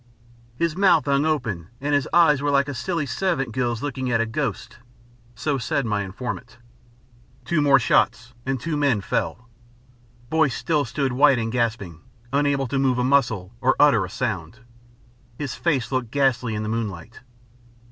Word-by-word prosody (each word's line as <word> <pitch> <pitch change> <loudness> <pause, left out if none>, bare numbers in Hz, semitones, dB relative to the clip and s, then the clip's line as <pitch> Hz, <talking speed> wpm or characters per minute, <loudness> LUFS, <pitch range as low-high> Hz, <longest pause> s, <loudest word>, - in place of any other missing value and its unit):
"His 170 +1 0
mouth 185 -5 +4
hung 140 +1 +2
open 110 - -2
and 145 +2 -2
his 145 -2 +1
eyes 155 -5 +5
were 145 - 0
like 140 -1 +2
a 145 - -4
silly 165 +5 -2
servant 140 -4 -1
girl's 120 -1 -2
looking 130 -3 -3
at 115 -1 +2
a 115 - +2
ghost." 115 -1 -4 0.6
So 140 +3 -1
said 125 +3 -1
my 105 -2 0
informant. 115 +3 -6 0.9
Two 170 -3 +1
more 140 -2 +6
shots 120 +1 +1
and 135 0 -2
two 165 +4 -3
men 140 -8 +1
fell. 115 +3 -3 0.8
Boyce 155 -5 +2
still 150 -4 0
stood 130 +2 -2
white 140 0 +5
and 115 -1 -2
gasping, 110 -9 -2 0.3
unable 140 -1 +1
to 135 +2 -2
move 130 -2 +2
a 125 - +1
muscle 115 -8 +1
or 130 +1 +3
utter 145 -1 +5
a - - -5
sound. 110 -3 -4 0.8
His 145 -3 -4
face 135 -8 -1
looked 130 -3 -1
ghastly 130 -4 +1
in 105 - -3
the - - -4
moonlight. 110 -3 -4
130 Hz, 165 wpm, -23 LUFS, 115-145 Hz, 0.9 s, more